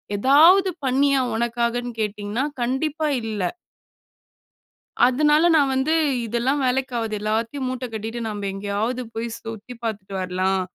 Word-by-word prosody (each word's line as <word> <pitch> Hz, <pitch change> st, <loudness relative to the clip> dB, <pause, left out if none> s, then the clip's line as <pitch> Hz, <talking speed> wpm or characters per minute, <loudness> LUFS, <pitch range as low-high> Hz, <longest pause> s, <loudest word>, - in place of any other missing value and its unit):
எதாவது 320 Hz, -, +6 dB, 0.2 s
பண்ணியா 275 Hz, +1 st, +3 dB, 0.2 s
உனக்காகன்னு 235 Hz, +1 st, -1 dB
கேட்டிங்கன்னா, 210 Hz, +4 st, -2 dB, 0.2 s
கண்டிப்பா 300 Hz, +5 st, -1 dB, 0.2 s
இல்ல. 215 Hz, -2 st, -3 dB, 1.7 s
அதனால 295 Hz, +4 st, +3 dB
நான் 280 Hz, -3 st, +3 dB
வந்து, 265 Hz, +4 st, +1 dB, 0.3 s
இதெல்லாம் 240 Hz, +5 st, 0 dB
வேலைக்கு 260 Hz, +1 st, 0 dB
ஆகாது 225 Hz, -2 st, -2 dB
எல்லாத்தையும் 225 Hz, +6 st, -2 dB
மூட்ட 255 Hz, 0 st, -4 dB
கட்டிட்டு 225 Hz, +2 st, -4 dB
நாம 205 Hz, -2 st, -4 dB
எங்கேயாவது 205 Hz, +5 st, -2 dB
போய் 225 Hz, +1 st, -2 dB
சுத்தி 225 Hz, +2 st, -8 dB
பாத்துட்டு 200 Hz, -4 st, -4 dB
வரலாம். 185 Hz, +1 st, 0 dB
235 Hz, 115 wpm, -23 LUFS, 215-270 Hz, 1.7 s, எதாவது